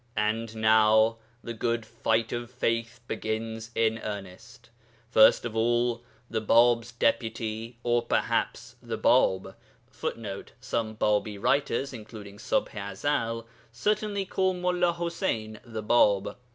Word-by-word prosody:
And 110 +1 -1
now 110 0 +4 0.3
the 115 - -5
'good 115 0 -1
fight 115 0 0
of 120 -1 -4
faith' 115 -1 -2
begins 110 +1 -4
in 115 0 +2
earnest. 110 +3 -8 0.4
First 110 0 +6
of 115 -2 -4
all, 120 +1 +1 0.3
the 110 -1 -2
Bāb's 115 +1 +4
Deputy 115 0 -1
(or 120 0 +2
perhaps 120 - -1
'the - - -4
Bāb' 95 0 +3 0.4
[Footnote: 100 -4 -5
Some 115 -4 -2
Bābī 105 -1 +1
writers 135 +3 +1
(including 105 -3 -10
Ṣubḥ 105 - 0
i 100 -2 -5
Ezel) 115 -1 -1 0.3
certainly 205 - -1
call 190 0 0
MullāḤuseyn 170 - -1
'the 110 -3 -6
Bāb.' 105 -3 +3
115 Hz, 120 wpm, -28 LUFS, 110-120 Hz, 0.4 s, First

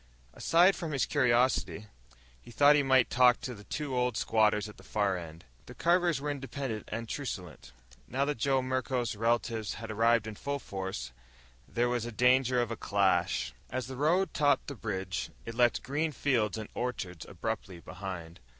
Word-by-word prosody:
Aside 175 +4 +4
from 165 -4 -4
his 135 - +1
curiosity, 125 -5 +2 0.6
he - - -15
thought 145 +4 +5
he 145 - +4
might 130 -3 +3
talk 125 -1 +5
to 125 - -4
the 105 -3 -12
two 145 -4 -3
old 125 -2 0
squatters 110 -1 +2
at 105 - -12
the - - -15
far 100 -2 0
end. 85 -2 -8 0.2
The - - -10
Carvers 175 -2 +2
were 145 +1 -2
independent 135 -5 -5
and 115 +1 -4
truculent. 90 - -6 0.4
Now 135 +3 0
that 145 -4 -2
Joe 135 +1 +2
Merklos' 130 -2 -1
relatives 115 -1 0
had 115 -1 -7
arrived 115 +1 +3
in 110 - -5
full 140 +7 -3
force, 95 - -5 0.6
there 120 +1 0
was 120 -2 -1
danger 125 +1 +3
of 120 -1 0
a - - -2
clash. 95 - +1 0.2
As 130 -2 -3
the 130 +2 -7
road 160 +6 +2
topped 145 -1 +2
the 140 - -6
ridge, 95 -4 -3 0.2
it 115 - -5
left 120 0 +2
green 150 +4 -1
fields 120 -9 0
and 110 -1 -5
orchards 95 -9 -4
abruptly 95 -2 -4
behind. 90 -2 -7
120 Hz, 175 wpm, -30 LUFS, 105-135 Hz, 0.6 s, thought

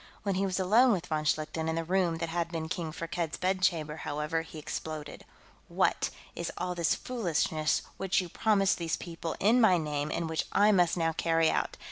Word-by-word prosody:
When 200 -1 0
he 195 +1 0
was 185 0 -1
alone 225 +7 +5
with 180 -3 -2
von 155 -2 -2
Schlichten, 155 +1 0
in 160 - -1
the 165 - -1
room 175 -1 +1
that 165 0 -3
had 170 0 -2
been 160 -2 -3
King 165 -2 -3
Firkked's 165 0 -3
bedchamber, 180 -4 0
however, 150 +2 -2
he 160 -1 -11
exploded: 155 0 -6 0.4
"What - - +1 0.3
is 170 - -3
all 180 0 -2
this 170 -2 +1
foolishness 165 -9 0
which 195 0 +1
you 180 - -2
promised 195 +1 +2
these 165 -1 -1
people 165 -1 -5
in 230 +5 +4
my 190 -6 +6
name 150 -2 -2
and 170 - -2
which 160 0 -1
I 210 +1 +5
must 180 -3 +3
now 165 -1 +1
carry 165 0 +2
out? - - -1
165 Hz, 195 wpm, -30 LUFS, 160-185 Hz, 0.4 s, my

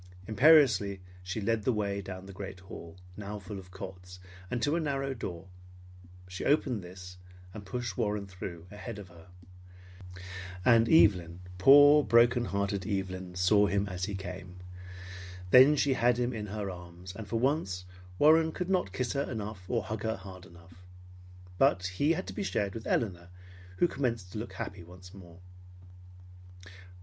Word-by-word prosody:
Imperiously 110 -6 +5 0.2
she 90 +4 -4
led 110 +1 0
the 130 - +1
way 100 -3 -2
down 95 -1 -8
the 100 - -10
great 95 -1 -8
hall, 85 -2 -11 0.2
now 105 0 -6
full 100 0 -8
of 90 -1 -13
cots, 90 -1 -9 0.3
and 125 - -2
to 145 +7 +1
a - - +1
narrow 135 -3 -2
door. 90 -7 -6 0.8
She 90 +1 -6
opened 135 -7 +1
this 90 0 -11 0.4
and 100 -2 -9
pushed 120 -2 -4
Warren 105 -3 -1
through 90 -3 -8
ahead 105 +2 -7
of 100 -3 -10
her. 85 -1 -16 1.4
And 115 -2 +5
Evelyn, 90 - +4 0.2
poor 145 +7 +8
heart - - -8
broken 120 0 +4
Evelyn, 95 -1 -3
saw 100 +3 +4
him 100 0 0
as 90 -1 -3
he 100 0 -4
came. 90 -1 -8 1.0
Then 130 +4 +8
she 140 -1 +2
had 120 -1 +2
him 125 0 -1
in 105 -2 -5
her 100 -1 -4
arms; 90 +1 -10
and 110 -1 -8
for 115 - -1
once 115 - -1 0.3
Warren 160 - +5
could 180 +3 -4
not 180 - +1
kiss 120 +6 -2
her 140 0 -2
enough 105 -5 -6
or 115 -3 0
hug 110 +2 -5
her 110 0 -1
hard 95 -2 -11
enough. 85 +1 -17 0.8
But 90 +1 +3
he 95 - +1
had 185 +3 -4
to - - -7
be - - -4
shared 100 - -1
with 115 - -7
Elinor 90 -6 -1 0.5
who 175 - +4
commenced 115 - -3
to 105 - -5
look 115 - -7
happy 100 -5 -6
once 90 +2 -14
more. 90 -4 -13
100 Hz, 165 wpm, -30 LUFS, 90-120 Hz, 1.4 s, poor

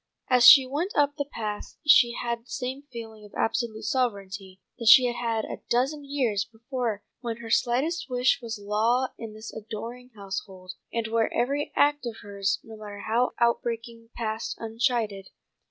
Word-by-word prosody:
As 250 -1 +7
she 270 -3 +10
went 300 +10 -3
up 290 0 +3
the 285 - -2
path 210 -2 -5
she 245 -5 +6
had 235 -1 -2
the 235 - -27
same 260 +1 -4
feeling 225 -3 -9
of 205 - -14
absolute 225 -1 -1
sovereignty 200 -5 -2 0.2
that 230 - -4
she 250 +3 +9
had 240 -1 -1
had 230 -2 -1
a - - -7
dozen 270 +5 +1
years 255 -8 0
before 230 -1 -4 0.2
when 230 -2 -4
her 230 -1 -8
slightest 275 +10 +1
wish 250 +2 +2
was 230 -1 -5
law 220 +5 +1
in 225 -2 -7
this 220 +1 -9
adoring 230 +3 -7
household, 190 -2 -6 0.2
and 230 -1 -1
where 225 0 +1
every 280 +4 -1
act 290 -3 +3
of 230 - -5
hers, 200 -1 -1
no 220 -1 -11
matter 205 -1 -8
how 230 +4 +1
outbreaking, 230 -1 -1
passed 220 -1 -3
unchided. 225 -4 -1
230 Hz, 170 wpm, -26 LUFS, 215-250 Hz, 0.2 s, she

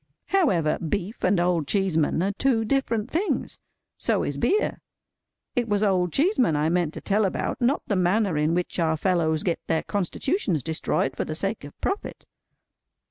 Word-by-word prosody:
However, 190 - +2
beef 195 +6 -3
and 185 0 +3
Old 175 -4 +1
Cheeseman 175 -4 +1
are 195 - +1
two 225 +1 +1
different 235 -3 0
things. 370 +6 -1 0.4
So - - +1
is - - -2
beer. 420 +2 +1 0.7
It 240 -3 0
was 205 0 +1
Old 185 -4 +2
Cheeseman 270 - +2
I 150 +2 +1
meant 170 -2 0
to - - -6
tell 210 +2 +1
about; 195 +5 -2
not 255 +5 +2
the 205 - 0
manner 185 0 +2
in 150 +2 +1
which 180 +1 -2
our 160 -1 +2
fellows 160 -3 +1
get 170 -3 0
their 160 - +1
constitutions 200 - -1
destroyed 155 -3 -1
for - - -1
the 155 - -5
sake 195 +3 -2
of 145 - -13
profit. 400 - -3
185 Hz, 170 wpm, -25 LUFS, 165-225 Hz, 0.7 s, and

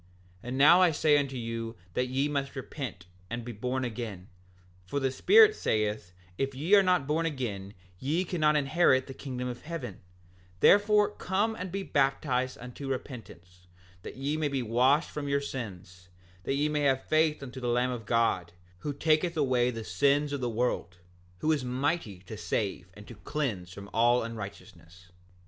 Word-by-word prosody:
7:14 125 - -5
Now 150 +7 +7
I 180 - +6
say 155 -1 +3
unto 135 -2 -3
you 115 -1 -4 0.2
that 125 +5 0
ye 135 +3 0
must 140 -2 -3
repent, 125 - -6 0.2
and 120 0 -5
be 120 - -5
born 125 +4 -2
again; 110 -6 -6 0.5
for 95 +11 -3
the 135 -1 0
Spirit 430 - +6
saith 105 - -1 0.3
if 135 0 -1
ye 160 +9 -1
are 205 - +9
not 180 -6 +2
born 160 +3 0
again 105 -9 -4 0.2
ye 160 +7 0
cannot 155 -4 +2
inherit 140 -2 +3
the 135 - -8
kingdom 125 -2 -5
of 125 -1 -6
heaven; 145 - -6 0.6
therefore 210 - +5
come 205 +3 -1
and 185 -3 -6
be 195 +1 -3
baptized 135 -4 0
unto 125 +3 -8
repentance, 90 - -7 0.3
that - - -9
ye 140 +3 -1
may 155 -1 0
be 135 -3 -2
washed 130 +7 +2
from 145 -1 -4
your 140 0 +2
sins, 90 -9 -7 0.4
that 135 - 0
ye 145 +2 +1
may 150 -1 -1
have 135 -2 +2
faith 155 -2 +1
on 130 - -7
the 125 -1 -5
Lamb 125 +1 +1
of 115 -4 -6
God, 105 -7 +1 0.3
who 145 +6 -3
taketh 160 +3 +1
away 130 -4 +2
the 115 -2 -5
sins 140 +10 +1
of 140 - -3
the 120 - -1
world, 110 -7 -1 0.4
who 155 - +2
is 150 -4 +1
mighty 125 - -1
to 95 +4 -9
save 100 -4 -3
and 105 0 -13
to - - -9
cleanse 105 - -3
from 100 +2 -9
all 120 +2 +4
unrighteousness. 90 -5 -9
130 Hz, 175 wpm, -29 LUFS, 115-150 Hz, 0.6 s, are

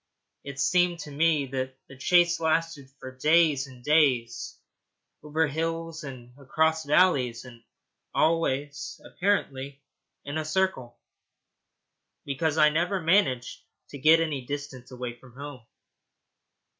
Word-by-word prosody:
It 140 -1 -8
seemed 175 +4 +2
to 150 - -9
me 150 0 +2
that 130 0 -4
the 130 - -13
chase 175 +5 +3
lasted 160 -3 -1
for 130 0 -9
days 150 -1 +3
and 125 -2 -15
days, 135 -6 +1 0.6
over 155 +2 0
hills 165 +2 -3
and 125 -4 -10
across 160 +3 0
valleys, 140 -7 +2
and 120 -2 -13 0.5
always, 145 -3 0
apparently, 140 -8 -2 0.4
in 145 +2 -3
a - - -2
circle, 155 -7 -1 1.3
because 155 +3 -1
I 150 -1 +6
never 175 +5 0
managed 160 -8 +1 0.3
to 140 - -9
get 160 +4 +6
any 150 -5 -2
distance 140 -2 -7
away 125 -1 -7
from 125 -1 -17
home. 140 -2 -8
145 Hz, 120 wpm, -27 LUFS, 130-165 Hz, 1.3 s, I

